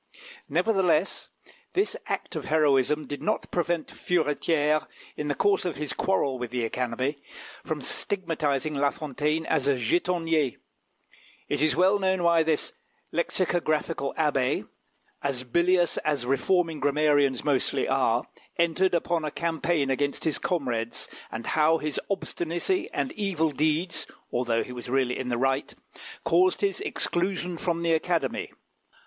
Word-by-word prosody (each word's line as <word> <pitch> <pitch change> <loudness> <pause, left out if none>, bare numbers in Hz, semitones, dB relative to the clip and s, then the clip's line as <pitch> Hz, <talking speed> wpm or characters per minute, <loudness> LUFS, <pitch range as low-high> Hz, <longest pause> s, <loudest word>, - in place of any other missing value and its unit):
Nevertheless, 190 -6 +2 0.4
this 390 +3 +1
act - - -3
of - - -4
heroism 150 -1 +3
did 145 - -6
not 215 - -1
prevent 170 -2 0
Furetière, 155 -2 +1 0.3
in 150 - -3
the 145 - 0
course 200 +6 +2
of 175 -5 -2
his 150 0 -3
quarrel 140 -9 0
with 120 -1 -4
the 120 -1 -1
Academy, 125 +4 -2 0.4
from - - -3
stigmatising 155 -6 -1
La 140 0 +2
Fontaine 150 +1 -2
as 150 -4 +1
a 140 -2 +3
jetonnier. 165 +1 +1 0.9
It 145 -1 -1
is 155 - +3
well 190 +3 +4
known 190 -2 +1
why 170 -1 +5
this 160 -2 0 0.4
lexicographical 165 -4 0
abbé, 140 -6 +1 0.5
as 135 -3 -2
bilious 170 +6 +2
as 145 -5 -1
reforming 160 +5 +1
grammarians 145 -3 +2
mostly 140 -4 +1
are, - - +2 0.3
entered 170 +2 +2
upon 170 -1 0
a 155 - -1
campaign 160 -3 0
against 140 +1 -1
his 160 -3 0
comrades, 120 -9 -2 0.2
and 115 +1 -5
how 160 +1 +3
his 150 -2 -3
obstinacy 180 - -1
and 265 - -1
evil 185 -7 0
deeds, 155 +4 0 0.2
although 120 -2 +1
he - - -9
was 125 -1 -7
really 130 -1 +1
in 130 - -3
the 120 -1 0
right, 135 +2 0 0.5
caused 370 +1 +3
his 400 -1 0
exclusion 180 - -1
from 170 0 -1
the 165 -1 +3
Academy. 165 +1 0
155 Hz, 140 wpm, -27 LUFS, 140-175 Hz, 0.9 s, why